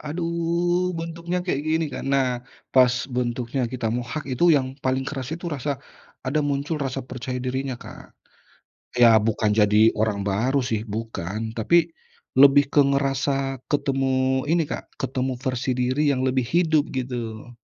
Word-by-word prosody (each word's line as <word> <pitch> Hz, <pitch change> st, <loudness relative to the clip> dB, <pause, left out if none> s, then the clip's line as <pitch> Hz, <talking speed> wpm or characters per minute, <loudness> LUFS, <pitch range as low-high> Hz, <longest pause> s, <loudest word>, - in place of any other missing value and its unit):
Aduh 170 Hz, +2 st, -1 dB
bentuknya 170 Hz, +2 st, -3 dB
kayak 145 Hz, -6 st, -1 dB
gini 160 Hz, +1 st, +2 dB
kan, -, -, -5 dB
nah 135 Hz, -1 st, +3 dB, 0.5 s
pas 125 Hz, -1 st, +6 dB, 0.2 s
bentuknya 125 Hz, +1 st, -1 dB
kita 125 Hz, -3 st, -3 dB
mohak 125 Hz, +5 st, -4 dB
itu 125 Hz, -, +1 dB
yang 130 Hz, -, 0 dB, 0.2 s
paling 130 Hz, 0 st, +1 dB
keras 135 Hz, -3 st, -5 dB
itu 175 Hz, -, -13 dB
rasa, 145 Hz, +1 st, -3 dB, 0.6 s
ada 145 Hz, +4 st, +1 dB
muncul 140 Hz, +3 st, -1 dB
rasa 135 Hz, 0 st, -3 dB
percaya 125 Hz, 0 st, -5 dB
dirinya, 130 Hz, +1 st, -2 dB
Kak. -, -, -12 dB, 0.8 s
Ya 120 Hz, -, +8 dB, 0.2 s
bukan 110 Hz, -1 st, +1 dB
jadi 105 Hz, 0 st, +4 dB, 0.2 s
orang 110 Hz, -2 st, +1 dB
baru 120 Hz, +8 st, +1 dB
sih 110 Hz, -2 st, 0 dB
bukan, 110 Hz, -3 st, -5 dB, 0.2 s
tapi 115 Hz, +9 st, +1 dB, 0.7 s
lebih 140 Hz, 0 st, +8 dB
ke -, -, +5 dB
ngerasa 140 Hz, 0 st, +1 dB, 0.4 s
ketemu 130 Hz, -2 st, +1 dB
ini, 170 Hz, -1 st, +3 dB
Kak, -, -, -4 dB, 0.2 s
ketemu 130 Hz, -1 st, -1 dB
versi 130 Hz, 0 st, -1 dB
diri 130 Hz, +3 st, +1 dB
yang 130 Hz, -2 st, -1 dB
lebih 130 Hz, 0 st, +1 dB
hidup 160 Hz, +2 st, +2 dB
gitu. 120 Hz, -3 st, -5 dB
130 Hz, 145 wpm, -24 LUFS, 125-150 Hz, 0.8 s, Ya